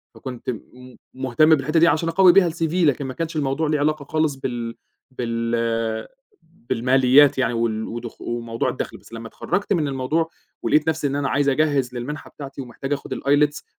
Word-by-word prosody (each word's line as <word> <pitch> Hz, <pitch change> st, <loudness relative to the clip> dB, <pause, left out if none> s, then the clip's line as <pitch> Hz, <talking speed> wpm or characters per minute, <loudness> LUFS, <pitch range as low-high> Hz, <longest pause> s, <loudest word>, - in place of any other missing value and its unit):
فكنت 125 Hz, -2 st, -7 dB
م 125 Hz, +2 st, -8 dB, 0.2 s
مهتم 130 Hz, +5 st, +4 dB
بالحتّة 155 Hz, +3 st, +1 dB
دي 170 Hz, -, +6 dB
علشان 165 Hz, +1 st, +2 dB
أقوي 185 Hz, +2 st, +6 dB
بها 185 Hz, -2 st, +5 dB
الCV 165 Hz, -1 st, -2 dB
لكن 150 Hz, -6 st, +2 dB
ما 130 Hz, -, -5 dB
كانش 165 Hz, +3 st, -4 dB
الموضوع 150 Hz, +1 st, 0 dB
لي 150 Hz, 0 st, +1 dB
علاقة 150 Hz, 0 st, 0 dB
خالص 155 Hz, -1 st, 0 dB
بال 120 Hz, -3 st, -4 dB, 0.4 s
بال 115 Hz, -2 st, -1 dB, 0.4 s
بالماليات 130 Hz, -2 st, +3 dB
يعني 125 Hz, -2 st, +1 dB
وال 115 Hz, -1 st, -1 dB
ودخ 120 Hz, 0 st, -7 dB
وموضوع 115 Hz, -1 st, -2 dB
الدخل، -, -, -5 dB
بس -, -, -18 dB
لمّا 115 Hz, 0 st, -7 dB
تخرجت 200 Hz, -, -1 dB
من 160 Hz, -5 st, +1 dB
الموضوع 140 Hz, +5 st, -1 dB, 0.3 s
ولقيت 150 Hz, +1 st, +2 dB
نفسي 160 Hz, -2 st, +1 dB
إن 140 Hz, -, -2 dB
أنا 140 Hz, -1 st, -1 dB
عايز 140 Hz, 0 st, +2 dB
أجهّز 140 Hz, -3 st, +1 dB
للمنحة 130 Hz, +5 st, -5 dB
بتاعتي 140 Hz, -1 st, -8 dB
ومحتاج 135 Hz, +2 st, -5 dB
أخد 140 Hz, -, -4 dB
الILETS 145 Hz, +1 st, +1 dB
135 Hz, 175 wpm, -22 LUFS, 120-155 Hz, 0.4 s, دي